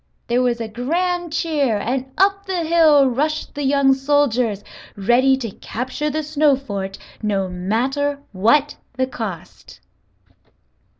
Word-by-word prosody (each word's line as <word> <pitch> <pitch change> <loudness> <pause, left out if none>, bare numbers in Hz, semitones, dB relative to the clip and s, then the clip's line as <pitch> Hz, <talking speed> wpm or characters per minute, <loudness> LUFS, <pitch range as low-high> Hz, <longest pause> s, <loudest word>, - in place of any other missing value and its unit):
There 240 +1 +1
was 245 -2 0
a 225 - -3
grand 340 +9 -2
cheer 300 -8 0
and 260 +5 -3
up 395 +1 +2
the 365 -3 -1
hill 315 -4 +5
rushed 300 +5 -1
the 290 - -5
young 275 0 +4
soldiers, 260 -6 +1 0.3
ready 245 +6 +3
to 235 -5 -5
capture 260 +9 -4
the 310 +1 -2
snow 300 -1 +3
fort 200 -7 -5 0.2
no 200 -3 0
matter 250 +11 -1
what 235 +10 +2 0.2
the 260 - +2
cost. 220 -9 -8
270 Hz, 130 wpm, -20 LUFS, 230-300 Hz, 0.3 s, hill